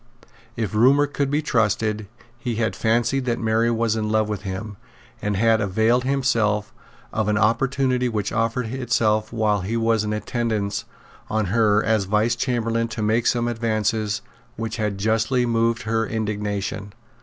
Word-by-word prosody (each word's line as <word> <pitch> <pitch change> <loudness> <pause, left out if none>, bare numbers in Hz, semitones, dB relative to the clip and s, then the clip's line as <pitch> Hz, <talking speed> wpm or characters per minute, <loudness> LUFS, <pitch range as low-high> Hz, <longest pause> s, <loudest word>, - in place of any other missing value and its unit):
If 110 -5 -3
rumour 135 +7 +5
could 140 -1 -2
be 150 +2 0
trusted, 110 -4 0 0.3
he 120 -2 -3
had 110 0 -1
fancied 120 +4 +1
that 120 -2 0
Mary 115 +1 +1
was 115 -1 +1
in 110 -1 -1
love 110 0 +1
with 105 -3 -3
him, 100 +1 -6 0.4
and 105 -1 -1
had 110 +1 +3
availed 110 +5 +2
himself 115 -6 +1 0.4
of 110 -1 0
an 105 0 +2
opportunity 125 +3 +1
which 105 -3 -2
offered 115 +2 0
itself 110 -3 0
while 110 -3 +1
he 110 +6 -2
was 115 -1 +2
in 105 - -2
attendance 105 -2 -2 0.4
on 110 -1 0
her 105 -2 +3
as 110 -3 +1
Vice 105 +4 +1
Chamberlain 115 -2 0
to 115 -1 -4
make 110 +2 +2
some 120 -1 +1
advances 110 -2 -1 0.3
which 115 0 -4
had 105 -3 -1
justly 115 +5 +1
moved 115 +1 +1
her 115 0 0
indignation. 105 -2 -3
110 Hz, 155 wpm, -23 LUFS, 105-120 Hz, 0.4 s, rumour